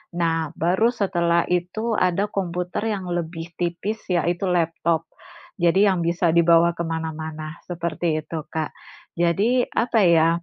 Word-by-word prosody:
nah, 165 -2 0
baru 185 +7 +2
setelah 170 -7 +1
itu 200 +6 -1
ada 185 +3 +1
komputer 180 0 -3
yang 190 -2 -5
lebih 165 -1 -4
tipis 175 +5 -2
yaitu 175 +2 0
laptop. 165 -1 0 0.5
Jadi 175 +4 +4
yang 190 -3 +2
bisa 170 0 +2
dibawa 170 0 +5
kemana-mana, 160 -1 -4
seperti 170 -2 -2
itu, 160 +1 -5
Kak. 160 -1 -2 0.5
Jadi, 200 +9 +2
apa 230 -1 +1
ya, 165 -1 +5
170 Hz, 125 wpm, -23 LUFS, 165-185 Hz, 0.5 s, dibawa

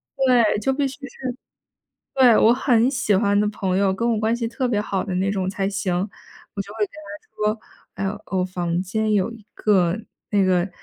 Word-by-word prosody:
对， 250 -6 +2
就 265 +6 +1
必 280 +1 0
须 270 - -5
是 255 -2 -6 0.8
对， 250 -4 +6
我 225 - +6
很 250 -1 +3
喜 230 -6 +1
欢 205 0 +3
的 210 - +2
朋 190 -3 -2
友、 195 -1 +2
跟 230 +5 0
我 220 - 0
关 220 +2 +1
系 235 -1 -2
特 250 +2 -2
别 215 -4 +1
好 195 -2 -2
的 190 -3 -4
那 190 +2 +1
种 190 -2 -1
才 195 0 -1
行， 195 -2 -1 0.6
我 200 - -2
就 200 - -12
会 225 - -10
跟 - - -40 0.4
她 210 -2 -4
说， 195 - -2
诶， - - -10 0.2
我 180 - +2
房 175 -2 -2
间 215 +3 -1
有 200 -1 +2
一 225 -2 -12
个 190 -2 +2 0.3
那 205 -2 +3
个， 180 0 +2
210 Hz, 220 characters per minute, -22 LUFS, 190-230 Hz, 0.8 s, 对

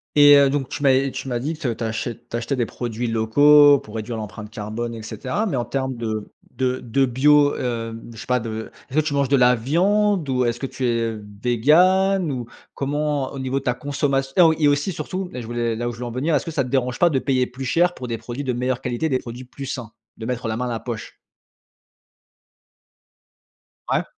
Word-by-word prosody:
et 145 -1 +8
heu, 140 -1 +5
donc 135 -2 -2
tu - - -5
m'av 135 0 +3
tu - - -6
m'as 120 -2 -1
dit 145 +6 -2
que 145 -7 -2
tu 115 - -6
achètes 115 +1 -4
tu 120 - -2
achetais 120 +4 -2
des 120 -3 0
produits 120 0 -4
locaux 145 +6 +6
pour 110 - -12
réduire 110 +1 -4
l'empreinte 105 0 -7
carbone, 110 +3 -5
et 110 - -8
cetera, 130 - -3
mais 175 -11 -1
en 120 - -1
termes 130 +1 -2
de 110 -3 -4 0.2
de 130 -1 -1
de 135 +3 +1
bio, 145 +3 +4
hem 115 -2 -4
je - - -13
sais - - -8
pas 125 0 +1
de 110 -1 -6 0.2
est - - -13
ce 155 - +3
que 155 - +1
tu 150 - -1
manges 140 -2 +1
de 140 - +4
la 125 -1 +5
viande 185 - +1
ou 125 -1 +1
est-ce 120 0 -1
que 135 - -3
tu 130 - -4
es 115 -2 0 0.3
vegan? 175 - +3
Ou 125 -3 -4 0.3
comment 145 0 -1
au 140 - -7
niveau 130 +1 -1
de 135 - -15
ta 125 - +2
consommation 135 0 -1
heu, 180 - +8
oh, 160 -1 +6
et 150 - +3
aussi 145 +6 +1
surtout, 180 +3 -4
là 125 - -6
je - - -8
voulais 120 0 -2
là 120 +2 -3
où - - -3
je 115 - -12
veux 125 - -4
en 120 - -5
venir. 140 +7 -1
Est-ce 140 - 0
que 165 - -4
ça 145 -3 0
te 125 - -7
dérange 125 -2 0
pas 175 - +5
de 140 -5 +1
payer 130 -2 +1
plus 130 +2 -7
cher 175 +7 +2
pour 125 - -7
des 115 -1 -3
produits 120 +5 -6
de 130 -2 -1
meilleure 125 +1 -1
qualité, 125 +6 -2
des 130 -2 +1
produits 120 +1 -8
plus 135 +2 -9
sains, 125 -5 -5 0.3
de 110 - -7
mettre 125 0 -3
la 110 0 -2
main 125 - -2
à - - -3
la 115 -2 -3
poche? 115 -3 -7 2.8
Ouais. - - +1
130 Hz, 240 wpm, -22 LUFS, 120-145 Hz, 2.8 s, et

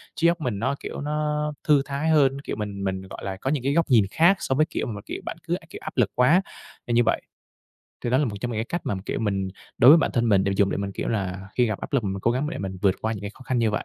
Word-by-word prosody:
trí 165 +2 +3
óc 170 0 +1
mình 120 -8 -2
nó, 130 +5 0
kiểu, - - -6
nó 150 0 -1
thư 150 -3 +5
thái 140 +3 -2
hơn, 140 -3 +3
kiểu, - - -4
mình 100 -2 -5
mình, 95 -1 -2
gọi 95 0 -10
là, 95 -1 -4
có 130 - -3
những 140 -3 0
cái 140 +2 +1
góc 165 +1 +3
nhìn 115 -6 +5
khác 175 +5 +5
so 130 - -1
với, 155 +3 +4
kiểu, 160 - -3
mà, 105 -4 -5
kiểu, - - -6
bạn - - -5
cứ, - - +1
kiểu, - - -9
áp - - -7
lực - - +3
quá 155 +9 +5 0.5
nên 120 - 0
như 120 - +5
vậy. 115 - +1 0.8
Thì 120 - 0
đó 130 - +4
là 150 - +2
một 110 -6 -3
trong 120 - -2
những 110 - -3
cái 110 - -1
cách 175 +8 -3
mà, - - -1
kiểu, - - -2
mình 100 -3 -1 0.3
đối 125 - +8
với 160 - +9
bản - - +1
thân 120 -1 +1
mình 100 -3 +4
để 100 - +1
dùng 100 -1 +3
để - - -1
mình, 100 0 -3
kiểu - - -3
là, 95 -3 -3
khi 125 - +3
gặp 105 -3 -3
áp - - -7
lực 135 -5 +1
mình 95 0 -2
cố 115 - +2
gắng 130 +5 -1
để - - -5
mình 95 -1 -4
vượt 95 -3 +4
qua 110 - 0
những 105 - -5
cái 100 - -4
khó - - -14
khăn 130 -1 -1
như 115 -2 +2
vậy. 105 - -2
120 Hz, 315 wpm, -25 LUFS, 100-145 Hz, 0.8 s, với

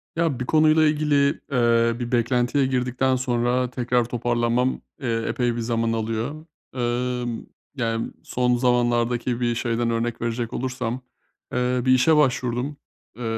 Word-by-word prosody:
Ya 165 -6 0
bir 125 - -2
konuyla 155 +1 +4
ilgili, 150 -1 +2 0.4
eee, 115 -2 +3
bir 120 0 -4
beklentiye 125 +3 +2
girdikten 130 0 0
sonra 125 0 0
tekrar 125 -1 0
toparlanmam, 120 +1 0 0.2
eee, 115 -3 -1
epey 120 -2 0
bir 120 - -3
zaman 115 0 0
alıyor. 115 +7 -3 0.3
Emm, 120 -1 -2 0.3
yani 115 -3 -2
son 125 0 +1
zamanlardaki 120 0 +1
bir 120 -1 +1
şeyden 120 0 -1
örnek 115 0 -2
verecek 115 0 -2
olursam, 125 -1 -3 0.5
eee, 125 0 +1
bir 130 - +4
işe 130 +5 +5
başvurdum. 130 0 0 0.4
Eee, 125 - -6
125 Hz, 135 wpm, -23 LUFS, 120-130 Hz, 0.5 s, işe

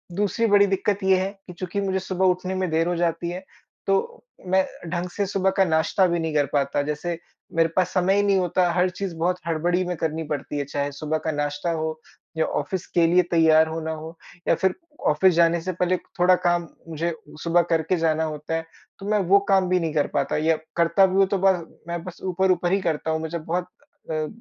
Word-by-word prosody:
दूसरी 205 +4 0
बड़ी 200 -1 +5
दिक़्क़त 195 +1 0
ये 190 0 +4
है 190 +1 -2 0.2
कि 180 - -8
चूँकि 185 +3 -4
मुझे 190 -1 0
सुबह 190 0 -1
उठने 185 +1 +1
में 185 -1 -1
देर 165 +1 +1
हो 175 - 0
जाती 170 0 -1
है 180 +2 -6 0.4
तो 470 - 0 0.2
मैं 190 +1 +3 0.3
ढंग 180 +1 -2
से 200 +3 -2
सुबह 195 0 +1
का 195 - +6
नाश्ता 170 +4 +2
भी 170 -1 0
नहीं 160 -1 -2
कर 145 -1 +3
पाता। 145 0 +1
जैसे 150 +3 -3 0.4
मेरे 165 0 +3
पास 185 -1 +2
समय 185 +1 +2
ही 205 - +3
नहीं 200 -1 +3
होता, 180 0 +1
हर 180 +1 +2
चीज़ 185 0 -5
बहुत 180 +2 0
हड़बड़ी 175 +3 +1
में 180 0 -2
करनी 160 +1 -2
पड़ती 145 0 -4
है, 145 - 0
चाहे 140 +1 -2
सुबह 155 +2 -2
का 160 - +1
नाश्ता 145 +2 -2
हो 160 -1 -3 0.4
या 160 - +2
ऑफ़िस 185 -2 -3
के 170 -1 +5
लिए 180 +2 +5
तैयार 160 -1 +5
होना 160 0 -4
हो 160 +1 -7 0.3
या - - +4
फ़िर 190 - +1 0.4
ऑफ़िस 180 +5 +4
जाने 170 0 +3
से 185 +3 -3
पहले 180 +1 +1 0.2
थोड़ा 180 +1 +6
काम 175 -1 +2 0.2
मुझे 165 +1 -2 0.3
सुबह 170 +1 +4
करके 165 +2 +2
जाना 160 -1 +1
होता 155 +1 -3
है। 165 - -3 0.3
तो 195 - -8
मैं 215 0 +3
वो 200 +1 +7
काम 190 -2 +3
भी 185 0 +3
नहीं 165 -3 -2
कर 150 -2 +1
पाता - - 0
या 160 +1 +2 0.2
करता 170 +3 +4
भी 185 - -1
हूँ 195 0 +5
तो 200 0 0
बस 180 -3 +2 0.2
मैं 170 -1 -4
बस 180 -1 -9
ऊपर-ऊपर 185 -1 +1
ही 195 0 +2
करता 160 -1 -1
हूँ। 160 - 0
मुझे 160 +1 -4
बहुत 175 +3 -3 0.4
अ, 155 -1 -1
175 Hz, 220 wpm, -24 LUFS, 160-185 Hz, 0.4 s, वो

